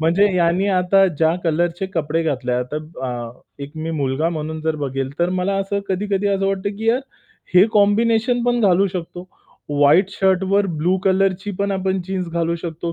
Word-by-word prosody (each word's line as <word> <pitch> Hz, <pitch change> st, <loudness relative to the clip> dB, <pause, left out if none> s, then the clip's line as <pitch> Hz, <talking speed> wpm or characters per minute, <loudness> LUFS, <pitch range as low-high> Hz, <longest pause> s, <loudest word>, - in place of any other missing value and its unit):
म्हणजे 175 Hz, +6 st, +3 dB
ह्यांनी 180 Hz, +2 st, +2 dB
आता 190 Hz, +1 st, +3 dB
ज्या 160 Hz, +2 st, +2 dB
कलरचे 170 Hz, +3 st, 0 dB
कपडे 160 Hz, 0 st, 0 dB
घातले 135 Hz, -5 st, -2 dB
आहे. 125 Hz, -, +1 dB
आता 150 Hz, +4 st, -4 dB
ब 155 Hz, +1 st, -13 dB
अ, 120 Hz, -1 st, -6 dB, 0.2 s
एक 140 Hz, -, -8 dB
मी 165 Hz, -, -3 dB
मुलगा 140 Hz, +4 st, 0 dB
म्हणून 160 Hz, -1 st, -4 dB
जर 160 Hz, -1 st, -1 dB
बघेल, 135 Hz, -2 st, -3 dB
तर 175 Hz, +1 st, +1 dB
मला 195 Hz, +2 st, 0 dB
असं 200 Hz, +1 st, -2 dB
कधी-कधी 200 Hz, +1 st, -1 dB
असं 195 Hz, -1 st, 0 dB
वाटतं 195 Hz, +1 st, -2 dB
की 225 Hz, -, -2 dB
"यार, 240 Hz, +3 st, +3 dB, 0.5 s
हे 180 Hz, -, +8 dB
कॉम्बिनेशन 225 Hz, +3 st, +2 dB
पण 245 Hz, 0 st, +1 dB
घालू 195 Hz, -2 st, +4 dB
शकतो, 180 Hz, 0 st, -7 dB, 0.4 s
व्हाईट 145 Hz, +7 st, +4 dB
शर्टवर 190 Hz, +1 st, +2 dB
ब्लू 180 Hz, +4 st, +2 dB
कलरची 190 Hz, +1 st, +1 dB
पण 200 Hz, 0 st, 0 dB
आपण 190 Hz, 0 st, -1 dB
जीन्स 185 Hz, -2 st, -3 dB
घालू 170 Hz, 0 st, -1 dB
शकतो 170 Hz, 0 st, -5 dB
180 Hz, 180 wpm, -20 LUFS, 160-195 Hz, 0.5 s, हे